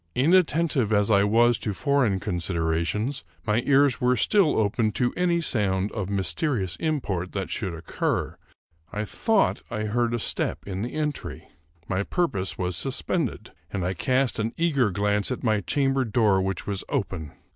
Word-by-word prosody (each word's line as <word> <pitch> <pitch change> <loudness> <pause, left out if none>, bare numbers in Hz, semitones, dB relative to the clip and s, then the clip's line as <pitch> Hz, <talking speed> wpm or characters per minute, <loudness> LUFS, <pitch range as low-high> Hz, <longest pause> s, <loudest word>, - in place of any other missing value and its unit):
In 140 +8 +3
attentive 160 - +2
as 105 0 +3
I 100 -1 +5
was 115 +3 +3
to 105 -4 -3
foreign 130 -7 +1
considerations, 90 - -1 0.2
my 105 +1 +2
ears 140 -2 +4
were 125 0 +3
still 185 - +3
open 110 +1 +1
to 125 -1 0
any 175 -1 +1
sound 100 - 0
of 100 -4 -4
mysterious 100 - -1
import 105 - -2
that 95 -2 -3
should 95 -6 -2
occur. 80 - -2 0.6
I 105 +1 -3
thought 220 - +1
I 110 - -3
heard 120 +2 0
a - - -2
step - - -1
in 95 -1 -4
the 120 - -4
entry. 150 -2 -4 0.4
My 95 0 0
purpose 100 - -1
was 90 -1 -1
suspended, 135 - -1 0.2
and 95 -3 -3
I 90 - 0
cast 130 +6 0
an 110 +2 -1
eager 145 -9 +2
glance 105 +1 0
at 130 - -4
my 110 -3 +2
chamber 135 +5 +1
door, 105 -4 +2
which 95 0 -2
was 100 -2 -3
open. 80 -7 -3
110 Hz, 165 wpm, -25 LUFS, 95-135 Hz, 0.6 s, I